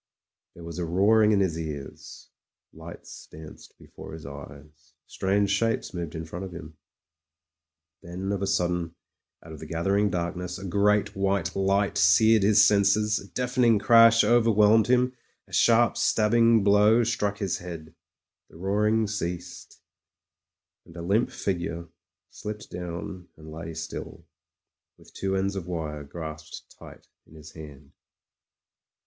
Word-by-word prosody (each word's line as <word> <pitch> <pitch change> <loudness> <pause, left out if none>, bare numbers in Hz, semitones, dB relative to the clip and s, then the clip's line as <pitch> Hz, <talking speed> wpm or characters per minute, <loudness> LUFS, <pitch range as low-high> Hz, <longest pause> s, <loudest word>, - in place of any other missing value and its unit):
There 85 - -12
was 85 0 -7
a - - -2
roaring 105 +6 +3
in 100 -2 +3
his 85 -4 -1
ears; 75 -4 -8 0.4
lights - - -12
danced 80 0 -13
be - - -17
fore - - -12
his 80 -1 -10
eyes; 70 +2 -12
strange 100 +1 0
shapes 115 +2 -1
moved 85 -2 -6
in 80 0 -5
front 90 +4 -7
of 95 - -7
him. 80 -2 -10 1.3
Then, 90 +3 -5
of 100 -1 -2
a 100 - -1
sudden, 90 -3 -1 0.5
out 80 - -11
of 80 - -10
the 80 - -9
gathering 95 +6 0
darkness 90 0 -4
a 95 - -9
great 100 +3 +1
white 95 -2 -1
light 100 +1 0
seared 110 +5 +5
his 105 +1 +5
senses, 105 +1 +2
a 100 - -12
deafening 125 -1 +1
crash 115 +2 +6
overwhelmed 110 -2 +4
him, 125 +1 +2 0.3
a - - -21
sharp 120 0 +3
stabbing 115 0 +3
blow 105 +3 +4
struck 105 -3 -1
his 100 -4 -2
head. 80 -3 -9 0.6
The - - -16
roaring 105 +4 +1
ceased, 90 -4 -6 1.0
and 85 - -15
a 85 - -6
limp 105 +7 +1
figure 85 -3 -4 0.4
slipped 105 0 -8
down 90 +1 -7
and 80 0 -12
lay 80 +1 -8
still, 80 0 -8 0.7
with - - -20
two 95 0 -2
ends 100 +1 -1
of 90 -3 -6
wire 80 -4 -5
grasped 80 +1 -9
tight - - -14 0.2
in 80 - -18
his 80 +1 -13
hand. 75 -4 -13
95 Hz, 145 wpm, -26 LUFS, 85-105 Hz, 1.3 s, crash